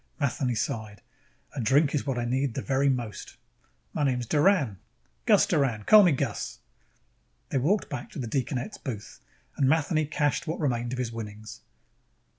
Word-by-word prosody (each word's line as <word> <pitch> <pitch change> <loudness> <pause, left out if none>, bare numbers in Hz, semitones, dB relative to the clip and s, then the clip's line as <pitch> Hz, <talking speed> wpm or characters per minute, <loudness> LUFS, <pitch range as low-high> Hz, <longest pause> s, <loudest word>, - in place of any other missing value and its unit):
Matheny 130 -3 0
sighed. 110 -2 -4 0.5
"A 135 - -2
drink 140 +6 +3
is 145 -1 -1
what 135 -2 -1
I 120 - -1
need 130 0 -1
the 135 - -3
very 140 +1 +2
most." 120 -5 -4 0.6
"My - - -1
name's 125 -3 0
Doran. 145 - +2 0.5
Gus - - +6
Doran. 120 -8 0
Call 215 - +8
me 180 -4 +5
Gus." 135 -5 -2 0.9
They 135 - +1
walked 190 +11 +1
back 125 -3 -6
to - - -8
the 130 - -3
deaconette's 130 - -3
booth 110 -7 -7 0.4
and 135 -2 +3
Matheny 155 0 +2
cashed 150 +2 0
what 160 - -3
remained 120 -5 -1
of 130 - -3
his 125 -2 -2
winnings. 110 -1 -8
130 Hz, 165 wpm, -27 LUFS, 120-145 Hz, 0.9 s, Call